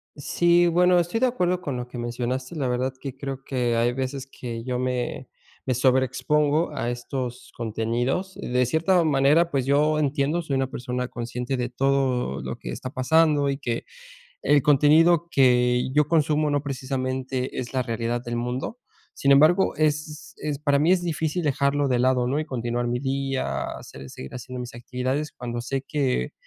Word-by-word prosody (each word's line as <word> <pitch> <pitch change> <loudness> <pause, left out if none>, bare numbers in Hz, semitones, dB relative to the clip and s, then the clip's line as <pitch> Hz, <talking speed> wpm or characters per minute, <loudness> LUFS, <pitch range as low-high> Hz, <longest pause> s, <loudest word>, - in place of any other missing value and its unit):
Sí, 175 +4 +3
bueno, 180 +1 +4
estoy 175 +6 -1
de 255 - +4
acuerdo 180 -7 0
con 140 -3 -3
lo 125 0 -5
que 125 - -9
mencionaste. 125 +5 -3
La 135 -4 -1
verdad 125 +2 -1
que 135 -2 -6
creo 135 -1 -6
que 125 -3 0
hay 120 +1 +2
veces 130 +1 -3
que 120 -3 -7
yo 125 0 -2
me 125 0 -2 0.4
me 130 - +1
sobreexpongo 145 +5 +2
a 120 -4 -2
estos 125 0 -5
contenidos. 120 - -2
De 125 +1 0
cierta 165 +7 +2
manera, 150 +3 +3
pues 135 -3 0
yo 150 +2 +3
entiendo, 145 +3 0
soy 145 -5 -2
una 135 -1 +1
persona 125 -2 -3
consciente 120 +2 -4
de 125 -1 -1
todo 130 - 0
lo - - -5
que - - -8
está 130 - -5
pasando 145 +1 +3
y 135 - -1
que 120 -4 -3 0.6
el 145 0 +4
contenido 155 +4 +5
que 125 -2 +3
yo 150 +1 +3
consumo 150 -1 +2
no 145 -1 +1
precisamente 130 -1 -3
es 125 +1 -6
la 130 - +1
realidad 115 0 -2
del 120 0 -4
mundo. 125 - -3 0.4
Sin 140 - +2
embargo, 155 +7 +5
es 150 0 -2
es 145 -2 -3
para 145 -2 +2
mí 155 +5 +3
es 185 -1 +3
difícil 160 0 -1
dejarlo 140 0 +1
de 125 - +2
lado, 125 0 +2
¿no?, 140 +4 0
y 155 - -2
continuar 120 -3 -2
mi 120 +1 -1
día, 135 - -2
hacer 65 0 -8
seguir 65 - -9
haciendo 125 +1 -7
mis 125 -1 -7
actividades 130 +5 -3
cuando 120 -1 -5
sé 135 +2 -2
que 135 - -1
135 Hz, 175 wpm, -24 LUFS, 125-150 Hz, 0.6 s, contenido